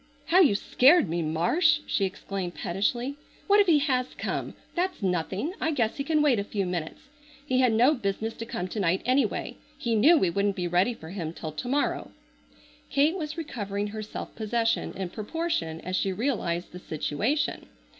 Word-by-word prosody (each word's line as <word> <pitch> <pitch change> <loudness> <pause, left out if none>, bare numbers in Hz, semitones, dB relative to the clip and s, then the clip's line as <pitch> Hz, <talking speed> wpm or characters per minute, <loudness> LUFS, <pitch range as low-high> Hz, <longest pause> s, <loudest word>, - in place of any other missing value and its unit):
"How 340 +4 +4
you 290 - +6
scared 270 - +5
me, 170 +1 -1
Marsh!" 295 - +2
she 195 - +1
exclaimed 190 -1 -5
pettishly. 240 +9 -1 0.3
"What 405 +1 +5
if 405 - +5
he 325 -3 +6
has 260 -3 0
come? - - -3 0.2
That's 360 - -2
nothing. 190 - -1
I 320 - +1
guess 240 -8 0
he 275 - -1
can 305 +1 +2
wait 265 -7 +4
a - - -1
few 200 -1 -2
minutes. 175 -3 -4 0.4
He 255 -3 +1
had 255 -2 +4
no 240 +7 +5
business 220 -2 -2
to 230 - -6
come 180 -5 -3
to 215 - -4
night 185 -1 +1
anyway. 255 +3 0 0.2
He 235 - -1
knew 290 +11 +6
we 185 - +2
wouldn't 200 +2 +1
be 180 -2 -2
ready 180 +7 +2
for 160 -4 -10
him 170 -5 -4
till 160 -2 -6
to 155 +11 -6
morrow." 285 +3 0 0.8
Kate 290 +5 +3
was 310 -3 -4
recovering 205 -9 -3
her 215 +1 -5
self 215 - -7
possession 225 +1 0
in 190 -2 -4
proportion 215 - -2
as 185 +1 -3
she 195 - +1
realized 185 -6 -2
the 180 - -8
situation. 190 - -1
220 Hz, 185 wpm, -27 LUFS, 185-285 Hz, 0.8 s, you